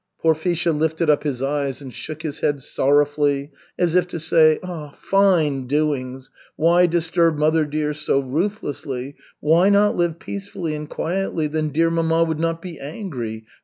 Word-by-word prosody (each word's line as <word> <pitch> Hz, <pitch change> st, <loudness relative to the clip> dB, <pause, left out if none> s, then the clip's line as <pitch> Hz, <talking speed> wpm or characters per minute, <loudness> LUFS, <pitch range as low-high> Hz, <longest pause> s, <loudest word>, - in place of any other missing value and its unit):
Porfisha 165 Hz, +1 st, +1 dB
lifted 160 Hz, +1 st, +1 dB
up 145 Hz, -, +2 dB
his 135 Hz, -4 st, -3 dB
eyes 140 Hz, -1 st, -1 dB
and 135 Hz, -3 st, -10 dB
shook 155 Hz, 0 st, -7 dB
his 155 Hz, -3 st, -4 dB
head 140 Hz, -2 st, 0 dB
sorrowfully, 145 Hz, +1 st, +1 dB, 0.3 s
as 175 Hz, -2 st, +1 dB
if 180 Hz, 0 st, +3 dB
to 170 Hz, -, -5 dB
say, 155 Hz, -1 st, +4 dB, 0.4 s
"Fine 165 Hz, -10 st, +2 dB
doings. 135 Hz, -3 st, -1 dB, 0.2 s
Why 175 Hz, +2 st, +4 dB
disturb 165 Hz, -1 st, +1 dB
mother 155 Hz, +1 st, +2 dB
dear 150 Hz, 0 st, -2 dB
so 150 Hz, -2 st, 0 dB
ruthlessly? 140 Hz, -3 st, -3 dB, 0.3 s
Why 165 Hz, +6 st, +4 dB
not 205 Hz, +1 st, +4 dB
live 170 Hz, -2 st, 0 dB
peacefully 190 Hz, -3 st, -5 dB
and 150 Hz, 0 st, -6 dB
quietly? 175 Hz, -2 st, -2 dB
Then 155 Hz, 0 st, -1 dB
dear 165 Hz, +3 st, +1 dB
mamma 165 Hz, 0 st, +2 dB
would 160 Hz, -2 st, -2 dB
not 165 Hz, 0 st, -1 dB
be 175 Hz, -4 st, -8 dB
angry. 130 Hz, -, -6 dB
155 Hz, 155 wpm, -21 LUFS, 145-170 Hz, 0.4 s, say